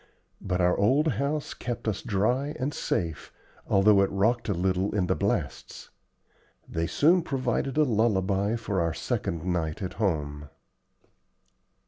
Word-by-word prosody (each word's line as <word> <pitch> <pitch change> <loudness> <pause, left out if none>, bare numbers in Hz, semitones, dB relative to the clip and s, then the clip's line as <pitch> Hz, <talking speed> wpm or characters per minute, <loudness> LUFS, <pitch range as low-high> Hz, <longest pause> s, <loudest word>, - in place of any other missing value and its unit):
But 90 -2 -1
our 90 0 +3
old 135 +10 +3
house 140 +4 -2
kept 120 -2 -5
us 105 -2 -1
dry 125 +9 0
and 140 +3 -1
safe, 80 -3 -3 0.4
although 100 0 +5
it 100 - +2
rocked 110 +5 +1
a - - +2
little 95 +3 0
in 95 -3 +2
the - - +1
blasts. - - -3 0.8
They 85 0 -2
soon 170 - +4
proved 135 -2 -2
a 155 - +5
lullaby 105 -4 +1
for 100 -5 -2
our 85 -1 -1
second 95 -9 -3
night 85 -3 -1
at 95 - -4
home. 75 -6 -1
100 Hz, 140 wpm, -27 LUFS, 90-125 Hz, 0.8 s, although